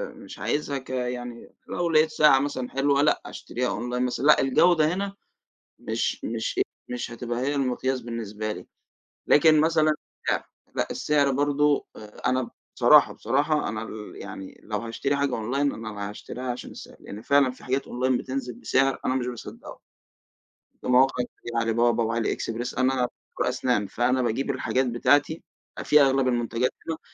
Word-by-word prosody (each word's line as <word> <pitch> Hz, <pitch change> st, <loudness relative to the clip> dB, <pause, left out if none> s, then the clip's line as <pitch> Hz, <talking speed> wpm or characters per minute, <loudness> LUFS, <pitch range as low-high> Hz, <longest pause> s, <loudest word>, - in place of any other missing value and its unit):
مش -, -, -11 dB
عايزها 145 Hz, -1 st, -1 dB
كيعني 125 Hz, -2 st, -5 dB, 0.2 s
لو 175 Hz, -1 st, -1 dB
لقيت 155 Hz, -1 st, +4 dB
ساعة 150 Hz, -3 st, +5 dB
مثلًا 135 Hz, -3 st, -3 dB
حلوة 140 Hz, +1 st, +2 dB
لا 150 Hz, -, +3 dB
أشتريها 125 Hz, +1 st, -4 dB
أونلاين 125 Hz, +3 st, -2 dB
مثلًا، 125 Hz, +2 st, -2 dB
لأ، 150 Hz, -, +6 dB
الجودة 155 Hz, +4 st, +4 dB
هنا 200 Hz, +1 st, -3 dB, 0.6 s
مش -, -, -2 dB
مش 115 Hz, -1 st, -3 dB
إيه، -, -, +4 dB, 0.2 s
مش 125 Hz, 0 st, -4 dB
هتبقى 120 Hz, 0 st, -4 dB
هي 140 Hz, +3 st, 0 dB
المقياس 130 Hz, -1 st, 0 dB
بالنسبة 110 Hz, -2 st, -4 dB
لي. -, -, -9 dB, 0.6 s
لكن 155 Hz, +1 st, +6 dB
مثلًا 155 Hz, -1 st, +3 dB, 0.4 s
السعر -, -, 0 dB, 0.3 s
لأ، -, -, 0 dB
السعر 145 Hz, -2 st, +2 dB
برضو 145 Hz, +1 st, +2 dB, 0.4 s
أنا 130 Hz, -1 st, 0 dB, 0.3 s
بصراحة، -, -, +6 dB
بصراحة 145 Hz, +6 st, 0 dB
أنا 110 Hz, +1 st, -4 dB
ال 110 Hz, -1 st, -8 dB
يعني 95 Hz, -1 st, -9 dB
لو 105 Hz, -1 st, -3 dB
هاشتري 115 Hz, +5 st, -2 dB
حاجة 140 Hz, -2 st, 0 dB
أونلاين 135 Hz, +6 st, 0 dB
أنا 105 Hz, -2 st, -6 dB
هاشتريها 125 Hz, +4 st, -6 dB
عشان 120 Hz, -, -7 dB
السعر، -, -, -11 dB
لأن 105 Hz, +2 st, -9 dB
فعلًا 140 Hz, +1 st, +3 dB
في 125 Hz, -, -16 dB
حاجات 130 Hz, +2 st, -1 dB
أونلاين 130 Hz, +1 st, 0 dB
بتنزل 130 Hz, -1 st, -4 dB
بسعر 135 Hz, +2 st, +1 dB
أنا 130 Hz, -, +1 dB
مش 125 Hz, -2 st, -1 dB
باصدقه، 120 Hz, -2 st, -8 dB, 1.0 s
في -, -, -10 dB
مواقع 125 Hz, 0 st, +4 dB
كتير 120 Hz, -, -11 dB
على 115 Hz, -1 st, +1 dB
بابا 120 Hz, 0 st, +2 dB
وعلى 115 Hz, 0 st, 0 dB
اكسبرس، 115 Hz, +2 st, -4 dB
أنا 130 Hz, -1 st, +2 dB, 0.3 s
طب -, -, +2 dB
أسنان 120 Hz, -5 st, 0 dB
فأنا 125 Hz, +6 st, +1 dB
باجيب 125 Hz, +4 st, -1 dB
الحاجات 130 Hz, 0 st, 0 dB
بتاعتي 145 Hz, +6 st, +2 dB, 0.4 s
في 150 Hz, -1 st, +6 dB
أغلب 135 Hz, -1 st, +3 dB
المنتجات 120 Hz, 0 st, 0 dB, 0.2 s
منهم 160 Hz, -1 st, -3 dB
130 Hz, 160 wpm, -25 LUFS, 120-140 Hz, 1.0 s, لأ